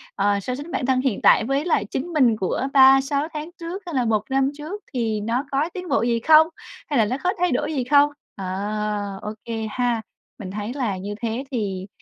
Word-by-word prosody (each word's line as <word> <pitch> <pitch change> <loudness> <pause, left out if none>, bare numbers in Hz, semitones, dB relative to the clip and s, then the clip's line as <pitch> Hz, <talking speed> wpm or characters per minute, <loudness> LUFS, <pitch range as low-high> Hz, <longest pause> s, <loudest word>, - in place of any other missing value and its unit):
ờ, 200 0 +2
so 250 +6 -3
sánh 290 +5 -8
bản 255 - -1
thân 260 -1 +2
hiện 255 -6 -1
tại - - +6
với 275 +6 0
lại 315 - +1
chính 260 +9 -4
mình 255 -7 +4
của 205 +7 -1
3-6 270 +2 +5
tháng 305 +1 -5
trước 345 +4 -5
hay 340 -4 -5
là 250 -2 +2
1 215 -2 +1
năm 270 +1 +2
trước 335 +8 -6
thì 225 -4 -1
nó 235 +6 -1
có 285 +4 +1
tiến 360 -2 -6
bộ 275 - +2
gì 235 -1 +1
không? 315 +5 +6 0.4
Hay 285 -5 +2
là 220 - +4
nó 250 +5 -2
có 365 +1 +2
thay 360 0 +2
đổi - - -1
gì 265 -4 0
không? 285 +3 +5 0.3
Ờ, 195 - -6 0.8
ô 210 - -5
kê 225 -1 -3
ha. 240 0 0 0.4
Mình 190 -4 -6
thấy 210 +4 -4
là 240 -9 -2
như 200 +2 -5
thế 230 +2 -2
thì 195 -6 -3
255 Hz, 225 wpm, -23 LUFS, 220-290 Hz, 0.8 s, tại